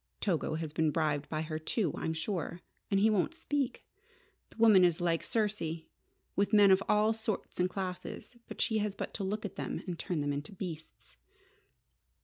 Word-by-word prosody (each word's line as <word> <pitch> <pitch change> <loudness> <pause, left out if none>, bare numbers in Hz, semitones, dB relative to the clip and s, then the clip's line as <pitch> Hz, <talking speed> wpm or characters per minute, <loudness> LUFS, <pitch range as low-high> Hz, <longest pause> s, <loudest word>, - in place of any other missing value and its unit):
Togo 165 -5 0
has 160 -2 -4
been 160 -1 +2
bribed 150 -2 0
by 155 0 -1
her, 155 0 -4
too, 170 +1 0
I'm 160 - -2
sure. 170 +1 -3 0.3
And 195 - +3
he 220 +2 +5
won't 210 - +1
speak. 290 -5 -2 0.6
The - - -20
woman 220 -5 +7
is 175 -2 +4
like 170 -2 +1
Circe, 200 -8 -1 0.5
with 200 +2 +1
men 205 -2 +8
of 190 +1 +5
all 210 +1 +4
sorts 220 -4 -4
and 180 +1 +3
classes. 185 +5 -5 0.2
She 220 -1 +1
has 205 -1 -1
but - - -5
to 200 - -4
look 210 +3 -2
at 205 - -6
them - - -3
to 180 - -3
turn 170 -1 -2
them 145 0 0
into 145 +7 -5
beasts!" 160 - -8
185 Hz, 180 wpm, -32 LUFS, 160-210 Hz, 0.6 s, men